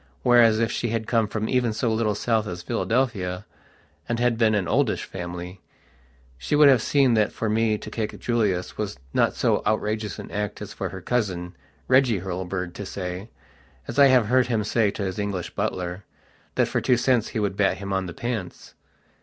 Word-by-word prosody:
Whereas, 120 -3 +5
if 115 -1 +1
she 120 - -2
had 115 0 -2
come 115 -1 +1
from 110 +1 -3
even 125 -3 +1
so 115 +1 0
little 110 -2 0
south 110 0 0
as 90 -2 -6
Philadelphia, 110 -5 -1 0.6
and 120 - 0
had 120 -1 +2
been 110 -2 +3
an 95 -4 0
oldish - - +1
family, 90 0 -7 0.8
she 65 - -1
would 150 0 +7
have 130 -4 +5
seen 135 -2 +3
that 105 -2 +2
for 115 - -3
me 110 0 +2
to - - -9
kick 110 -2 -4
Julius 105 -8 -1
was 105 -8 -3 0.2
not - - +2
so - - +1
outrageous 110 0 -1
an - - -9
act 105 -1 -3
as - - -7
for - - -4
her - - -8
cousin, 90 -7 -2 0.3
Reggie 130 -7 +4
Hurlbird, 90 -1 -4
to 100 - -6
sayas 95 +1 -5 0.7
I 140 - +9
have 130 -4 +5
heard 125 +3 +3
him 115 -3 0
say 105 0 +2
to 100 - -4
his 95 +2 -3
English 100 -4 -3
butlerthat 90 +1 -4
for - - -1
two 125 - +3
cents 125 -2 +2
he - - -3
would 100 -2 -1
bat 100 -1 +2
him 100 0 -5
on 95 -1 -1
the 90 - -7
pants. 115 -5 -5
110 Hz, 190 wpm, -24 LUFS, 95-115 Hz, 0.8 s, I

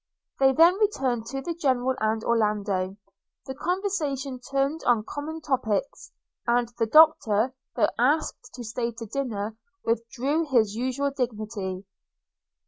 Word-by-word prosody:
They 270 -1 +6
then 335 +7 +5
returned 260 - 0
to 270 +2 -4
the 340 - -2
General 260 -5 +1
and 220 +1 0
Orlando 205 -4 0 0.2
– - - -59
the 265 - -5
conversation 295 -5 -2
turned 275 +4 -1
on 235 -3 +3
common 315 +2 -5
topics; 260 -5 -2 0.4
and 240 0 +3
the 225 - +2
Doctor, 255 -5 +5 0.2
though - - +3
asked 260 -1 +1
to 245 - -7
stay 235 +1 -2
dinner, 225 -2 -4 0.3
withdrew 240 +6 0
with 325 -3 -2
his 220 -6 +3
usual 260 +4 -1
dignity. 215 -7 -4
250 Hz, 135 wpm, -26 LUFS, 220-280 Hz, 0.4 s, They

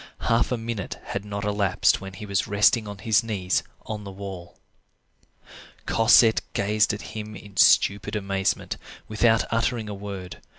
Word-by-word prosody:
Half 115 +2 +1
a 125 - +1
minute 115 -4 -5
had 100 - -4
not 100 0 -5
elapsed 100 -2 +2
when 95 0 -8
he 105 - -8
was 100 -2 -1
resting 105 +2 +3
on 100 -1 -7
his 110 +2 +2
knees 100 -5 -1 0.2
on 105 -1 -5
the 100 - -8
wall. 95 -3 -9 1.3
Cosette 115 0 +5
gazed 105 +2 +2
at 105 - -7
him 105 0 -6
in 100 0 -12
stupid 100 +2 +4
amazement, 100 -1 -1 0.3
without 110 +1 +3
uttering 115 -1 0
a - - -4
word. 100 -2 -8
105 Hz, 155 wpm, -25 LUFS, 100-110 Hz, 1.3 s, Cosette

